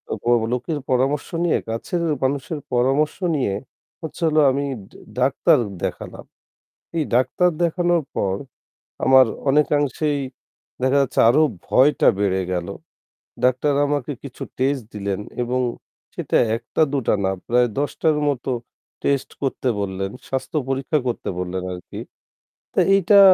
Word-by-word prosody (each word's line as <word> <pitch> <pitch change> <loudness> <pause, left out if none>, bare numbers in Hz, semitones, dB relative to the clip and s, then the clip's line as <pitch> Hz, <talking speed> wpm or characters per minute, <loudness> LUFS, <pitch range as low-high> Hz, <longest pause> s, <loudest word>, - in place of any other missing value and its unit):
অ - - -2 0.4
লোকের 135 +5 -2
পরামর্শ 135 +3 +1 0.2
নিয়ে, 170 - +3
কাছের 115 +10 -2 0.2
মানুষের 140 +3 -1
পরামর্শ 135 +5 +2 0.2
নিয়ে 125 -9 0 0.5
হচ্ছে 160 +1 -8
হলো 155 0 +4
আমি 140 +2 -1
ডা 100 -2 -14 0.2
ডাক্তার 140 +5 +4 0.3
দেখালাম। - - -5 0.7
এই 160 - +1
ডাক্তার 130 +8 +3
দেখানোর 175 0 +2
পর, 95 -1 0 0.7
আমার 130 -1 +7 0.2
অনেকাংশেই 145 0 +1 0.6
দেখা 130 +2 +3
যাচ্ছে; 135 - 0
আরও 140 +7 +5 0.3
ভয়টা 140 +3 +4
বেড়ে 95 -2 +1
গেল। 90 -1 -2 0.8
ডাক্তার 130 +3 +2
আমাকে 145 -1 -1
কিছু 135 -3 -8 0.2
টেস্ট 135 -1 0
দিলেন 100 -1 -3 0.2
এবং 125 +1 0 0.5
সেটা - - 0 0.2
১ 115 - -10
টা, - - +4
দুটো 135 -5 +1
না, 95 - +2 0.2
প্রায় 120 +1 +3
১০ 145 +1 0
টার 155 -2 +4
মতো 135 -1 -3 0.5
টেস্ট 140 -1 +1
করতে 135 -1 -1
বললেন, 95 -1 -3 0.2
স্বাস্থ্য 135 +3 -3
পরীক্ষা 135 +3 0
করতে 120 - -3
বললেন 90 0 -3
আরকি। 90 -1 -8 0.7
তা - - +3
এইটা 195 +1 +5
135 Hz, 130 wpm, -22 LUFS, 120-150 Hz, 0.8 s, আমার